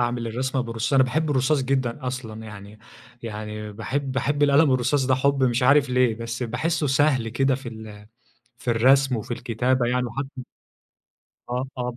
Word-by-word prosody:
أعمل 120 Hz, -1 st, -1 dB
الرسمة 130 Hz, +3 st, -2 dB
بالرصاص، 115 Hz, 0 st, -3 dB
أنا 135 Hz, -1 st, +6 dB
باحب 155 Hz, +4 st, -1 dB
الرصاص 135 Hz, +1 st, +2 dB
جدًا 130 Hz, 0 st, -1 dB
أصلًا 115 Hz, -4 st, -5 dB
يعني، 105 Hz, 0 st, -11 dB, 0.4 s
يعني 105 Hz, -1 st, -6 dB
باحب 130 Hz, +6 st, -3 dB
باحب 145 Hz, +3 st, 0 dB
القلم 145 Hz, 0 st, +5 dB
الرصاص 130 Hz, +2 st, +1 dB
ده 130 Hz, -, +3 dB
حُب 140 Hz, +1 st, +1 dB
مش 125 Hz, 0 st, +1 dB
عارف 135 Hz, +1 st, +4 dB
ليه، 125 Hz, -2 st, +3 dB
بس 115 Hz, +2 st, -5 dB
باحسه 150 Hz, +7 st, -1 dB
سهل 135 Hz, -4 st, +2 dB
كده 135 Hz, +3 st, +1 dB
في 135 Hz, -2 st, -7 dB
ال 110 Hz, -2 st, -10 dB, 0.5 s
في 120 Hz, -, -2 dB
الرسم 130 Hz, +2 st, +4 dB
وفي 110 Hz, -, -7 dB
الكتابة 125 Hz, +1 st, 0 dB
يعني 125 Hz, +1 st, 0 dB
وحتى 135 Hz, +1 st, -6 dB, 1.0 s
آه، 125 Hz, +2 st, -2 dB
طبعًا. 125 Hz, -1 st, -4 dB
125 Hz, 165 wpm, -24 LUFS, 115-135 Hz, 1.0 s, أنا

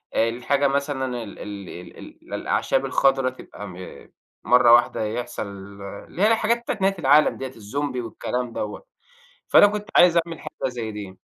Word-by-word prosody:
الحاجة 125 Hz, +5 st, +1 dB
مثلًا 135 Hz, -3 st, -2 dB
ال 100 Hz, -, -11 dB
ال 100 Hz, -2 st, -7 dB
ال 90 Hz, -, -10 dB
ال -, -, -13 dB
الأعشاب -, -, 0 dB
الخَضرا 135 Hz, -1 st, +2 dB
تبقى 105 Hz, -5 st, -10 dB
م 90 Hz, -, -10 dB, 0.7 s
مَرّة 125 Hz, -1 st, +6 dB
واحدة 120 Hz, -2 st, +4 dB
يحصَل 120 Hz, 0 st, -4 dB
اللي 100 Hz, -, -9 dB
هي 210 Hz, -, +6 dB
الحاجات 225 Hz, +1 st, +2 dB
بتاعة 235 Hz, -, -3 dB
نهاية 195 Hz, -1 st, +1 dB
العالم 145 Hz, +1 st, +4 dB
ديّة، 135 Hz, -, -4 dB
الزومبي 125 Hz, +3 st, -4 dB
والكلام 120 Hz, +1 st, -4 dB
دوّة، 105 Hz, -1 st, -5 dB, 0.6 s
فأنا -, -, +8 dB
كنت 210 Hz, 0 st, -3 dB
عايز 175 Hz, -1 st, +7 dB
أعمل 165 Hz, -2 st, -8 dB
حاجة -, -, -4 dB
زي 115 Hz, -3 st, -5 dB
دي. 100 Hz, -3 st, -8 dB
125 Hz, 160 wpm, -23 LUFS, 105-145 Hz, 0.7 s, فأنا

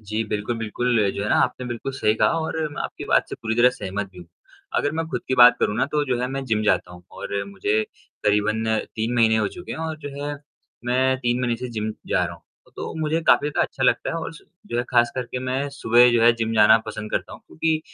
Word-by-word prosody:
जी, 110 Hz, +1 st, -2 dB
बिल्कुल, 105 Hz, +3 st, -3 dB
बिल्कुल 115 Hz, -1 st, +1 dB
जो 100 Hz, -, -4 dB
है 105 Hz, -, -2 dB
ना -, -, +3 dB
आपने 125 Hz, -, -2 dB
बिल्कुल 120 Hz, +2 st, -4 dB
सही 110 Hz, -5 st, +1 dB
कहा -, -, +3 dB
और 160 Hz, 0 st, -3 dB
मैं -, -, -4 dB
आपकी -, -, -6 dB
बात -, -, +2 dB
से -, -, -5 dB
पूरी 110 Hz, 0 st, -1 dB
तरह 120 Hz, +2 st, +5 dB
सहमत 100 Hz, -5 st, -5 dB
भी 90 Hz, -, -15 dB
हूँ। 85 Hz, -, -11 dB, 0.5 s
अगर 145 Hz, -, +1 dB
मैं 165 Hz, +1 st, -2 dB
खुद -, -, -3 dB
की 130 Hz, -, +2 dB
बात 120 Hz, 0 st, +8 dB
करूँ 105 Hz, -, +1 dB
ना 125 Hz, -, +1 dB
तो 150 Hz, -1 st, +1 dB
जो 125 Hz, -3 st, -1 dB
है 125 Hz, -, 0 dB
मैं 135 Hz, 0 st, -3 dB
जिम 110 Hz, -4 st, 0 dB
जाता 90 Hz, -4 st, +1 dB
हूँ 90 Hz, 0 st, -13 dB
और 100 Hz, 0 st, -4 dB
मुझे 100 Hz, +2 st, 0 dB, 0.4 s
करीबन 105 Hz, +1 st, +2 dB, 0.3 s
3 115 Hz, +2 st, -1 dB
महीने 115 Hz, -2 st, +4 dB
हो 110 Hz, -2 st, +1 dB
चुके 175 Hz, -, -8 dB
हैं -, -, -6 dB
और 160 Hz, -1 st, -3 dB
जो 145 Hz, -, -7 dB, 0.2 s
है, 145 Hz, 0 st, -3 dB, 0.5 s
मैं 130 Hz, +2 st, +2 dB
3 120 Hz, -1 st, 0 dB
महीने 120 Hz, -2 st, 0 dB
से 125 Hz, +2 st, -6 dB
जिम 110 Hz, -1 st, -3 dB
जा -, -, +1 dB
रहा -, -, -5 dB
हूँ। -, -, -18 dB, 0.3 s
तो -, -, -5 dB
मुझे 155 Hz, +1 st, 0 dB
काफ़ी 140 Hz, +4 st, +5 dB
ज़्यादा 150 Hz, -, +1 dB
अच्छा 135 Hz, -, -4 dB
लगता 130 Hz, -, +2 dB
है -, -, -3 dB
और 165 Hz, -, -4 dB
सु -, -, -15 dB, 0.2 s
जो 155 Hz, -, -4 dB
है -, -, +2 dB
ख़ास 120 Hz, -1 st, +4 dB
करके 125 Hz, 0 st, -4 dB
मैं 130 Hz, +2 st, -2 dB
सुबह 120 Hz, -3 st, +5 dB
जो 120 Hz, -1 st, +3 dB
है 120 Hz, +1 st, +7 dB
जिम 115 Hz, -1 st, -1 dB
जाना 110 Hz, 0 st, +7 dB
पसंद 105 Hz, 0 st, -6 dB
करता -, -, -2 dB
हूँ -, -, -11 dB
क्योंकि 160 Hz, 0 st, 0 dB
120 Hz, 255 wpm, -23 LUFS, 110-130 Hz, 0.5 s, बात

